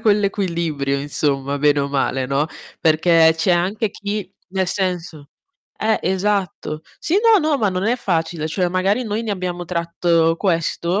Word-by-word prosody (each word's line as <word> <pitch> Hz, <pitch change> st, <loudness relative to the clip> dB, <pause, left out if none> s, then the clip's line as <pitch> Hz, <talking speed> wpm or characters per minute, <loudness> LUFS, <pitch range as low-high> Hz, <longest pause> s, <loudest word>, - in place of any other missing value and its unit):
quell'equilibrio 170 Hz, -10 st, 0 dB
insomma 140 Hz, -1 st, -1 dB
bene 145 Hz, 0 st, +3 dB
o 140 Hz, -, -1 dB
male, 135 Hz, -2 st, 0 dB
no, 140 Hz, +3 st, 0 dB, 0.3 s
perché 160 Hz, +1 st, +5 dB
c'è 165 Hz, +3 st, +1 dB
anche 190 Hz, +5 st, +1 dB
chi 205 Hz, -2 st, -4 dB, 0.2 s
nel 190 Hz, 0 st, -1 dB
senso 180 Hz, -7 st, -3 dB, 0.5 s
eh, 220 Hz, 0 st, +1 dB
esatto. 190 Hz, -4 st, -1 dB, 0.2 s
Sì, 340 Hz, -, 0 dB
no, 450 Hz, -1 st, +6 dB
no, 295 Hz, -3 st, +2 dB
ma 210 Hz, -, +2 dB
non 185 Hz, +1 st, -2 dB
è 240 Hz, +3 st, +2 dB
facile. 165 Hz, -6 st, -1 dB
Cioè, 180 Hz, +2 st, 0 dB
magari 190 Hz, +7 st, +1 dB
noi 215 Hz, 0 st, -2 dB
ne 220 Hz, -3 st, -2 dB
abbiamo 180 Hz, -2 st, -4 dB
tratto 170 Hz, -1 st, +1 dB
questo, 170 Hz, 0 st, 0 dB
175 Hz, 155 wpm, -20 LUFS, 160-200 Hz, 0.5 s, no